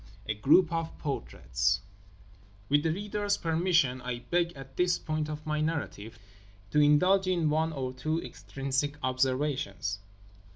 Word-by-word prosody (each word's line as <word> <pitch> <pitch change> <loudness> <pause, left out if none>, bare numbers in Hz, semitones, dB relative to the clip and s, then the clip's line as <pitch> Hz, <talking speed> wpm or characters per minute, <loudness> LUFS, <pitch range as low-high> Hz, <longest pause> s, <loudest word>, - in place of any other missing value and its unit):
A 110 - 0
GROUP 155 - +4
OF 165 0 -3
PORTRAITS - - -1 0.9
With 145 +1 +4
the 160 +1 +1
reader's 205 +2 -1
permission 160 -6 +2
I 125 -1 -3
beg, 175 -1 +2
at 135 -1 -11
this 180 0 +2
point 155 -1 -2
of 150 0 -6
my 155 0 -1
narrative, 140 -9 -3 0.5
to 150 - +3
indulge 180 +7 +5
in 170 -5 +2
one 160 +1 +1
or 130 -4 -3
two 155 +6 -1
extrinsic 140 -1 -3
observations. 130 -6 0
150 Hz, 135 wpm, -29 LUFS, 130-165 Hz, 0.9 s, indulge